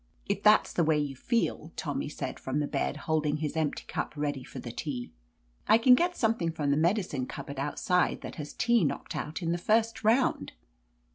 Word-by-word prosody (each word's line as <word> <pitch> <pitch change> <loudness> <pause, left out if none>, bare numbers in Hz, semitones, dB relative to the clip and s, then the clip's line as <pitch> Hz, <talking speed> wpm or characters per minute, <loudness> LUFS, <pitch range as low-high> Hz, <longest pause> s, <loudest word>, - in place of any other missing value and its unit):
"If 200 0 -1
that's 210 +1 +5
the 170 - +2
way 155 -1 +3
you 145 -2 -2
feel," 170 - -1
Tommy 145 -1 -3
said, - - -5
from 135 +2 -2
the 150 - +1
bed, 145 - -2
holding 155 -2 +1
his 155 0 -3
empty 155 -2 -1
cup - - -3
ready 145 -3 -2
for - - -11
the 120 - -6
tea. 125 -2 -5 0.6
"I 220 - +7
can 250 +2 +6
get 350 +7 +2
something 220 -8 +1
from 150 -3 -1
the - - +3
medi 175 +7 +2
cine 130 -7 -4
cupboard 140 -1 -6
outside 175 +5 0
that - - -8
has 150 -2 -6
tea 235 -3 +3
knocked 145 - -2
out 160 +4 -4
in 165 - 0
the 175 - -1
first 225 +5 +1
round." 230 +5 +2
160 Hz, 205 wpm, -29 LUFS, 145-215 Hz, 0.6 s, I